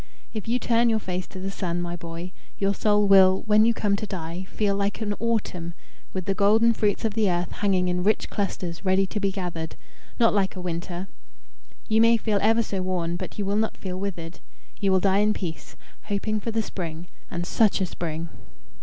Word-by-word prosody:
If 215 Hz, -1 st, -5 dB
you 235 Hz, +2 st, +2 dB
turn 235 Hz, -1 st, +2 dB
your 225 Hz, -, +3 dB
face 185 Hz, -3 st, -3 dB
to 190 Hz, -, -9 dB
the 195 Hz, +1 st, -3 dB
Sun, 175 Hz, -3 st, -2 dB
my 175 Hz, 0 st, -3 dB
boy, 170 Hz, +1 st, -7 dB, 0.3 s
your 200 Hz, 0 st, +1 dB
soul 210 Hz, +1 st, +3 dB
will, 190 Hz, -1 st, +6 dB
when 215 Hz, 0 st, +5 dB
you 235 Hz, -, +4 dB
come 205 Hz, -2 st, +1 dB
to 215 Hz, -, -4 dB
die, 175 Hz, -1 st, -5 dB
feel 205 Hz, -2 st, 0 dB
like 200 Hz, 0 st, -1 dB
an 210 Hz, -2 st, -1 dB
autumn, 195 Hz, -7 st, -2 dB, 0.4 s
with 185 Hz, -2 st, -4 dB
the 195 Hz, -, +1 dB
golden 215 Hz, +4 st, +4 dB
fruits 210 Hz, 0 st, 0 dB
of 220 Hz, -, 0 dB
the 215 Hz, -2 st, +2 dB
earth 175 Hz, -1 st, -1 dB
hanging 190 Hz, -3 st, +1 dB
in 180 Hz, 0 st, 0 dB
rich 215 Hz, +3 st, +2 dB
clusters 185 Hz, -4 st, -3 dB
ready 190 Hz, 0 st, +3 dB
to 210 Hz, +3 st, -4 dB
be 200 Hz, -1 st, +1 dB
gathered 175 Hz, -4 st, -4 dB, 0.4 s
not 230 Hz, -1 st, +5 dB
like 200 Hz, -2 st, +1 dB
a -, -, -6 dB
winter. 175 Hz, +1 st, -4 dB, 0.8 s
You 220 Hz, 0 st, +4 dB
may 230 Hz, 0 st, +6 dB
feel 215 Hz, -2 st, 0 dB
ever 225 Hz, +2 st, +4 dB
so 195 Hz, -3 st, -3 dB
worn, 175 Hz, -2 st, -1 dB
but -, -, -6 dB
you 205 Hz, -, -1 dB
will 200 Hz, +1 st, 0 dB
not 220 Hz, 0 st, 0 dB
feel 185 Hz, -1 st, -5 dB
withered. 175 Hz, -4 st, -5 dB, 0.4 s
You 195 Hz, -2 st, +2 dB
will 190 Hz, -1 st, +4 dB
die 195 Hz, 0 st, +3 dB
in 210 Hz, +1 st, +3 dB
peace, 170 Hz, -4 st, -6 dB, 0.3 s
hoping 215 Hz, +1 st, -1 dB
for 230 Hz, -, -4 dB
the 225 Hz, 0 st, 0 dB
spring 170 Hz, -4 st, -5 dB, 0.2 s
and 175 Hz, 0 st, -3 dB
such 215 Hz, +2 st, +3 dB
a 190 Hz, -, +1 dB
spring!" 165 Hz, -1 st, -4 dB
195 Hz, 210 wpm, -25 LUFS, 180-215 Hz, 0.8 s, will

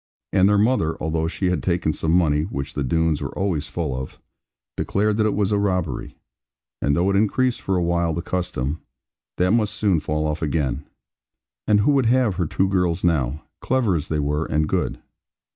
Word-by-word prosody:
And 95 Hz, +1 st, +5 dB
their 105 Hz, -, +4 dB
mother 105 Hz, -7 st, +2 dB
(although 80 Hz, +1 st, -1 dB
she 90 Hz, +2 st, -1 dB
had 90 Hz, -, 0 dB
taken 85 Hz, -3 st, 0 dB
some 80 Hz, -, -2 dB
money, 80 Hz, -4 st, +3 dB
which 70 Hz, -4 st, -4 dB
the 70 Hz, -, -2 dB
Doones 80 Hz, +3 st, +1 dB
were -, -, -5 dB
always 85 Hz, -6 st, -1 dB
full 80 Hz, -6 st, -3 dB
of) 65 Hz, 0 st, -6 dB, 0.6 s
declared 105 Hz, +1 st, 0 dB
that 110 Hz, -1 st, +3 dB
it 105 Hz, -, 0 dB
was 100 Hz, -1 st, +1 dB
a 105 Hz, -, +2 dB
robbery; 90 Hz, -5 st, -2 dB, 0.6 s
and 70 Hz, -, +2 dB
though 90 Hz, +4 st, +2 dB
it -, -, 0 dB
increased 120 Hz, +5 st, +1 dB
for 95 Hz, -, -1 dB
a 90 Hz, -, +1 dB
while 85 Hz, 0 st, +1 dB
the 85 Hz, +2 st, -3 dB
custom, 85 Hz, -6 st, -3 dB, 0.6 s
that 90 Hz, +1 st, +2 dB
must 110 Hz, -2 st, +1 dB
soon 100 Hz, -6 st, +2 dB
fall 75 Hz, +1 st, -2 dB
off 75 Hz, 0 st, -2 dB
again. 75 Hz, -4 st, -1 dB, 0.8 s
And 105 Hz, -1 st, +4 dB
who 130 Hz, -, +3 dB
would 135 Hz, -4 st, +3 dB
have 120 Hz, -6 st, +2 dB
her 90 Hz, -4 st, 0 dB
two 95 Hz, +5 st, +1 dB
girls 90 Hz, -2 st, 0 dB
now, 75 Hz, -5 st, 0 dB, 0.2 s
clever 125 Hz, -6 st, +1 dB
as 80 Hz, -1 st, -2 dB
they 80 Hz, -, -1 dB
were 75 Hz, +2 st, 0 dB
and 75 Hz, +1 st, +1 dB
good? -, -, -1 dB
85 Hz, 195 wpm, -22 LUFS, 75-100 Hz, 0.8 s, And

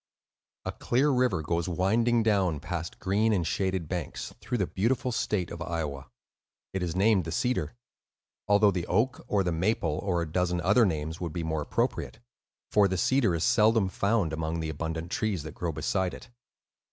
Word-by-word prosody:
A -, -, -1 dB
clear 135 Hz, +5 st, +1 dB
river 125 Hz, -, +1 dB
goes 85 Hz, +2 st, -1 dB
winding 115 Hz, +7 st, +2 dB
down, 95 Hz, -8 st, +2 dB
past 85 Hz, +2 st, -5 dB
green 105 Hz, +4 st, +1 dB
and 90 Hz, -6 st, +1 dB
shaded 95 Hz, 0 st, -1 dB
banks, 85 Hz, -4 st, -4 dB
through 125 Hz, +1 st, -2 dB
the 95 Hz, -, +1 dB
beautiful 120 Hz, +8 st, 0 dB
state 100 Hz, -5 st, -1 dB
of 85 Hz, -, -7 dB
Iowa. 75 Hz, -6 st, -3 dB, 0.7 s
It 95 Hz, -, -2 dB
is 85 Hz, -1 st, -2 dB
named 100 Hz, 0 st, +3 dB
the 80 Hz, -, -5 dB
Cedar, 120 Hz, -, -1 dB, 0.7 s
although 100 Hz, 0 st, +5 dB
the 90 Hz, -2 st, -3 dB
Oak, 120 Hz, +7 st, +1 dB
or 100 Hz, -2 st, +2 dB
the 90 Hz, -, 0 dB
Maple, 85 Hz, -2 st, 0 dB
or 90 Hz, -4 st, 0 dB
a -, -, -5 dB
dozen 90 Hz, 0 st, 0 dB
other 105 Hz, +6 st, +4 dB
names 80 Hz, -1 st, -3 dB
would 85 Hz, -3 st, -3 dB
be 85 Hz, -, -3 dB
more 80 Hz, -1 st, -1 dB
appropriate, -, -, -2 dB, 0.5 s
for 105 Hz, -2 st, +5 dB
the 95 Hz, 0 st, -1 dB
Cedar 120 Hz, -3 st, +2 dB
is 80 Hz, -, -1 dB
seldom 110 Hz, -2 st, +4 dB
found 100 Hz, -4 st, 0 dB
among 80 Hz, +1 st, -2 dB
the 80 Hz, -1 st, -3 dB
abundant 80 Hz, +2 st, -4 dB
trees 105 Hz, -8 st, -1 dB
that 80 Hz, -2 st, -7 dB
grow 85 Hz, -1 st, -3 dB
beside 90 Hz, +4 st, -1 dB
it. 125 Hz, -, -13 dB
90 Hz, 180 wpm, -28 LUFS, 80-105 Hz, 0.7 s, although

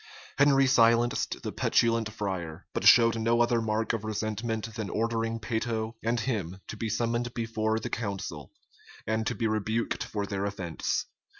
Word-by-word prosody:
Henry 140 Hz, -1 st, +5 dB
silenced 120 Hz, -1 st, +3 dB
the -, -, -3 dB
petulant 115 Hz, -1 st, +2 dB
friar; 95 Hz, -7 st, -4 dB
but -, -, -2 dB
showed 115 Hz, -1 st, +7 dB
no 115 Hz, +1 st, +2 dB
other 120 Hz, -1 st, +3 dB
mark 110 Hz, 0 st, 0 dB
of 115 Hz, -2 st, -2 dB
resentment 110 Hz, +1 st, -3 dB
than 110 Hz, -3 st, -4 dB
ordering 115 Hz, 0 st, -1 dB
Peyto 110 Hz, 0 st, -2 dB
and 115 Hz, +1 st, +1 dB
him 100 Hz, -7 st, -2 dB
to -, -, -5 dB
be 110 Hz, +1 st, -3 dB
summoned 120 Hz, +2 st, -1 dB
before 110 Hz, -1 st, -1 dB
the -, -, -5 dB
council, 95 Hz, -, -4 dB, 0.5 s
and 110 Hz, 0 st, -1 dB
to -, -, -1 dB
be 115 Hz, -, -2 dB
rebuked 110 Hz, +1 st, -1 dB
for 105 Hz, -1 st, -3 dB
their 100 Hz, 0 st, -2 dB
offence. 95 Hz, -5 st, -2 dB
110 Hz, 160 wpm, -28 LUFS, 105-115 Hz, 0.5 s, showed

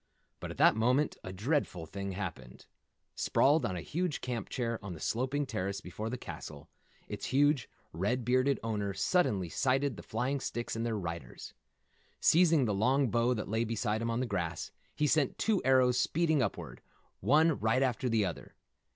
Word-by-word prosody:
But -, -, -6 dB
at -, -, -8 dB
that -, -, +6 dB
moment 125 Hz, +6 st, +2 dB
a 95 Hz, -, -6 dB
dreadful 100 Hz, -, -1 dB
thing 100 Hz, +3 st, -5 dB
happened. 80 Hz, -10 st, -7 dB, 0.5 s
Sprawled 150 Hz, +4 st, +3 dB
on 95 Hz, -, -4 dB
a 90 Hz, -, -4 dB
huge 170 Hz, -, -2 dB
camp 120 Hz, -5 st, -4 dB
chair 115 Hz, -4 st, -3 dB
on 100 Hz, -3 st, -5 dB
the 80 Hz, -, -9 dB
sloping 130 Hz, -, -1 dB
terrace 100 Hz, -4 st, -3 dB
before 105 Hz, +4 st, -6 dB
the 125 Hz, -, -3 dB
castle, 75 Hz, -10 st, -9 dB, 0.4 s
its -, -, -5 dB
huge, 145 Hz, -1 st, +2 dB, 0.2 s
red 105 Hz, +9 st, -1 dB
bearded 130 Hz, +3 st, +2 dB
owner 105 Hz, -3 st, -2 dB
suddenly 100 Hz, -, +1 dB
sighted 135 Hz, -, 0 dB
the -, -, -7 dB
flying 125 Hz, +5 st, -2 dB
sticks 120 Hz, -3 st, -4 dB
and 115 Hz, -, -2 dB
their 115 Hz, -2 st, -1 dB
riders. 85 Hz, -9 st, -6 dB, 0.7 s
Seizing 165 Hz, -5 st, +5 dB
the 105 Hz, -, 0 dB
long 125 Hz, +5 st, +2 dB
bow 120 Hz, +1 st, +2 dB
that 105 Hz, -, -4 dB
lay 110 Hz, +3 st, 0 dB
beside 110 Hz, -1 st, -1 dB
him 115 Hz, -, -1 dB
on 115 Hz, +2 st, 0 dB
the -, -, 0 dB
grass, 85 Hz, -7 st, -3 dB, 0.2 s
he 150 Hz, -, +1 dB
sent 145 Hz, -2 st, +2 dB
two 220 Hz, -3 st, +1 dB
arrows 130 Hz, -1 st, +4 dB
speeding 160 Hz, -1 st, +2 dB
upward, 80 Hz, -, -4 dB, 0.4 s
one 155 Hz, +2 st, +3 dB
right 110 Hz, +5 st, +2 dB
after 125 Hz, -1 st, 0 dB
the 110 Hz, -3 st, +2 dB
other. 90 Hz, -, -6 dB
115 Hz, 175 wpm, -31 LUFS, 100-135 Hz, 0.7 s, that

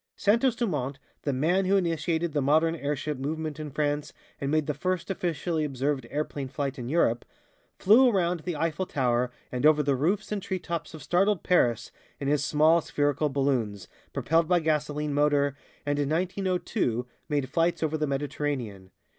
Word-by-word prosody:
Santos 235 Hz, +4 st, +3 dB
Dumont, 145 Hz, -, -2 dB, 0.2 s
"the 145 Hz, -, -1 dB
man 170 Hz, +9 st, +1 dB
who 195 Hz, +2 st, +3 dB
initiated 165 Hz, -2 st, 0 dB
the 145 Hz, -, +1 dB
modern 160 Hz, +4 st, +3 dB
airship 145 Hz, -1 st, -3 dB
movement 155 Hz, +2 st, -3 dB
in 155 Hz, -1 st, -5 dB
France 145 Hz, +1 st, -1 dB, 0.3 s
and 140 Hz, -, -2 dB
made 155 Hz, 0 st, +2 dB
the 150 Hz, -, -1 dB
first 185 Hz, +2 st, -2 dB
officially 170 Hz, -3 st, -1 dB
observed 135 Hz, -2 st, -1 dB
airplane 145 Hz, -2 st, -3 dB
flight 135 Hz, 0 st, -3 dB
in 120 Hz, 0 st, -5 dB
Europe," 125 Hz, -7 st, +2 dB, 0.5 s
flew 240 Hz, +6 st, +6 dB
around 180 Hz, -5 st, +1 dB
the 175 Hz, +1 st, -4 dB
Eiffel 165 Hz, +4 st, -1 dB
Tower 125 Hz, -2 st, +1 dB, 0.2 s
and 125 Hz, +1 st, -3 dB
over 150 Hz, 0 st, +5 dB
the 140 Hz, -1 st, +2 dB
roofs 185 Hz, +12 st, 0 dB
and 210 Hz, -2 st, -1 dB
treetops 170 Hz, -3 st, -4 dB
of 155 Hz, -, -10 dB
startled 190 Hz, +4 st, +2 dB
Paris 120 Hz, -11 st, +2 dB, 0.3 s
in 140 Hz, -, -3 dB
his 145 Hz, 0 st, +2 dB
small 155 Hz, +3 st, +4 dB
spherical 145 Hz, 0 st, 0 dB
balloons, 130 Hz, -8 st, -1 dB, 0.2 s
propelled 165 Hz, +1 st, +1 dB
by 180 Hz, 0 st, +4 dB
gasoline 150 Hz, -2 st, -1 dB
motor, 145 Hz, -1 st, +2 dB, 0.3 s
and 145 Hz, 0 st, 0 dB
in 140 Hz, -1 st, 0 dB
1902 180 Hz, -, -1 dB, 0.2 s
made 145 Hz, -3 st, 0 dB
flights 165 Hz, +3 st, +1 dB
over 160 Hz, 0 st, 0 dB
the 155 Hz, -1 st, 0 dB
Mediterranean. 135 Hz, -8 st, -3 dB
150 Hz, 165 wpm, -27 LUFS, 140-170 Hz, 0.5 s, flew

